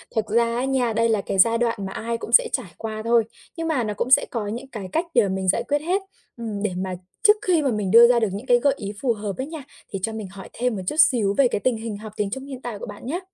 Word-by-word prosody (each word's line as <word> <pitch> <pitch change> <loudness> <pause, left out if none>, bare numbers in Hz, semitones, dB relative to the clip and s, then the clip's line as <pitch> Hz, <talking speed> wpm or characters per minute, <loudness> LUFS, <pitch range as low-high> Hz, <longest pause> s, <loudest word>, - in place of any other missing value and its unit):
thật 220 - +1
ra 235 +2 +1
á 250 +2 -1
nha, 255 -4 0
đây 230 +1 +2
là 215 -3 +2
cái 195 - -3
giai 230 +4 +5
đoạn 235 -1 +1
mà 190 - -5
ai 230 +1 -3
cũng - - -8
sẽ - - +6
trải - - -2
qua 220 -1 -5
thôi, 230 -1 +4 0.3
nhưng 330 0 -2
mà 285 -7 +1
nó 210 -1 -2
cũng 240 - -3
sẽ - - +6
có 220 -4 -3
những 235 +6 -5
cái 205 -7 -7
cách 330 - 0
để 235 -4 +4
mình 190 0 -2
giải 215 +5 +2
quyết 290 0 +1
hết. 370 +5 0 0.4
Ừm, 215 -3 -5
để 210 - 0
mà 185 0 -3 0.3
trước 420 0 +7
khi 345 -4 +4
mà 275 -4 +1
mình 210 -3 -2
đưa 235 +2 +9
ra 240 -1 +4
được 225 - +1
những 205 +6 -6
cái 245 -1 +4
gợi 280 +1 +3
ý 200 0 -5
phù 250 -4 +2
hợp 205 -2 -5
ấy 260 - -3
nha, 315 -2 -8 0.3
thì 195 - -4
cho 225 - -1
mình 220 -2 -5
hỏi 195 -1 -10
thêm 250 -1 -1
một 190 - -4
chút - - -1
xíu 240 -10 +4
về 275 - +5
cái 220 - -2
tình 250 0 0
hình 220 -2 -5
học 215 0 -10
tiếng 205 -1 -1
Trung 265 +2 -5
hiện 265 -2 -8
tại 225 -5 -6
của - - -6
bạn - - -10
nhá? 315 +8 -2
230 Hz, 305 wpm, -23 LUFS, 210-260 Hz, 0.4 s, đưa